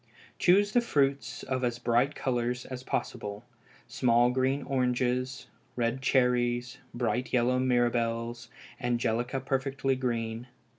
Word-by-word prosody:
Choose 200 +3 +4
the 245 - +4
fruits 140 -10 0
of 130 -1 -2
as 120 -1 0
bright 120 +4 +1
colors 125 -1 -1
as 130 -1 -6
possible 105 -3 -4 0.4
small 120 -1 +3
green 130 +2 0
oranges, 125 -1 0 0.3
red 120 +2 -1
cherries, 125 -1 +1
bright 120 +1 -1
yellow 125 +1 +2
mirabelles, 120 -1 0 0.3
angelica 120 +1 0
perfectly 135 0 -1
green. 120 -2 -3
125 Hz, 110 wpm, -29 LUFS, 120-130 Hz, 0.4 s, Choose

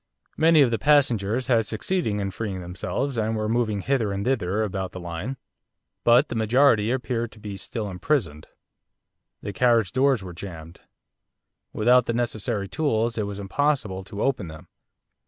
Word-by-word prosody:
Many 160 -2 +5
of 125 - +1
the 115 - 0
passengers 125 -4 +2
had 115 -4 +2
succeeded 110 - -1
in 100 -1 -2
freeing 100 -1 -4
themselves, 105 +9 -3
and 110 +1 0
were 110 0 -1
moving 110 -3 0
hither 120 -3 0
and 100 +1 -3
thither 110 -5 0
about 95 -2 -3
the 95 - -6
line. 85 +9 -5 0.7
But 120 +5 +5
the - - -3
majority 115 0 +3
appeared 120 -2 -2
to 110 - -16
be 105 -2 -6
still 105 +2 -5
imprisoned. 90 - -2 1.0
The 100 - -4
carriage 115 -4 +3
doors 130 -4 +2
were 90 -2 -8
jammed. 85 -2 -9 0.9
Without 125 +3 +4
the 115 - 0
necessary 110 -3 -2
tools 115 -3 0
it 105 -2 -2
was 100 0 -6
impossible 105 -3 -1
to 100 +1 -5
open 130 -9 0
them. 80 +2 -11
110 Hz, 160 wpm, -24 LUFS, 100-125 Hz, 1.0 s, Many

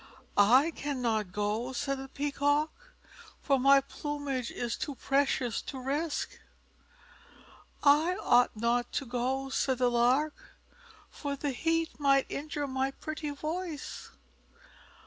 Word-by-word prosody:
"I 250 +10 +5
cannot 240 - -2
go," 210 +6 -2
said 275 0 -2
the 270 - -7
Peacock, 290 +2 0 0.7
"for 275 -2 +2
my 275 +1 +6
plumage 280 -3 -4
is 240 -1 -3
too 285 - -4
precious 270 -4 +1
to 270 - -7
risk." 285 +5 -2 1.4
"I 305 +5 +5
ought 245 - +3
not 235 +2 +1
to 275 - -1
go," 255 +2 -2
said 265 -1 0
the 250 -1 +2
Lark, 255 +6 +1 0.5
"for 285 -1 -4
the 285 0 -2
heat 330 +5 -1
might 275 -2 +4
injure 290 0 -3
my 265 0 -1
pretty 305 +2 -5
voice." 310 +2 -5
275 Hz, 120 wpm, -30 LUFS, 250-290 Hz, 1.4 s, my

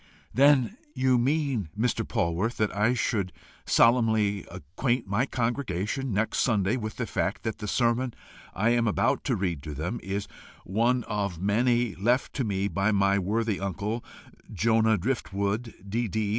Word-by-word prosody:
"Then 140 - +4 0.2
you 130 -1 +3
mean, 135 - 0
Mr. 120 +2 +1
Polwarth, 85 +8 0
that 105 -2 0
I 110 +5 +2
should 100 -6 -1 0.4
solemnly 110 -4 +3
acquaint 120 - -2
my 100 +7 0
congregation 120 0 -2
next 110 +3 0
Sunday 105 -2 +2
with 110 -3 -4
the - - -2
fact - - -2
that 110 - -3
the 105 - -5
sermon 120 +2 +1 0.4
I 110 +5 +2
am 120 -1 +2
about 105 - +1
to - - +1
read 85 -6 -2
to 75 -1 -7
them 90 +11 -3
is 100 +1 -3 0.4
one 120 +5 +1
of 100 -6 -3
many 120 +3 +2
left 120 +8 0
me 100 -3 -1
by 100 +2 +1
my 100 -1 +3
worthy 105 +2 0
uncle, 100 +4 -3 0.5
Jonah 110 +2 +3
Driftwood, 105 +1 -2 0.2
D.D. 110 0 -1
110 Hz, 145 wpm, -27 LUFS, 100-120 Hz, 0.5 s, Then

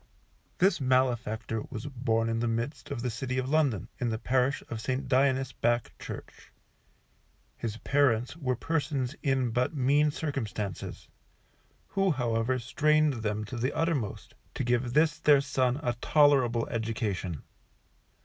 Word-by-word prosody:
This 190 -4 +3
malefactor 120 -4 +1
was 120 -2 -6
born 120 -4 0
in 115 0 0
the 120 - 0
midst 115 +6 -3
of 135 -5 -4
the 125 - -1
City 125 +3 -3
of 130 0 -1
London, 135 - +1
in 125 - 0
the 110 - -1
Parish 130 +4 +1
of 115 -2 -5
St. 130 +3 -2
Dionis 130 0 +2
Back 120 -1 0
Church. - - -9 1.0
His 110 -1 -4
parents 130 -2 +1
were 130 -6 -1
persons 140 -1 -1
in 135 -4 +1
but 125 +6 0
mean 145 +3 +3
circumstances, 115 - -4 0.8
who 195 -1 +1
however 125 -3 0
strained 150 +2 +2
them 105 0 -2
to 120 - -6
the 130 +4 -1
uttermost 160 -10 -1 0.2
to - - -1
give 120 0 0
this 155 +2 +3
their 145 -2 +6
son 130 -1 0
a 120 - +1
tolerable 135 -6 +4
education. 110 - -3
125 Hz, 140 wpm, -29 LUFS, 115-140 Hz, 1.0 s, their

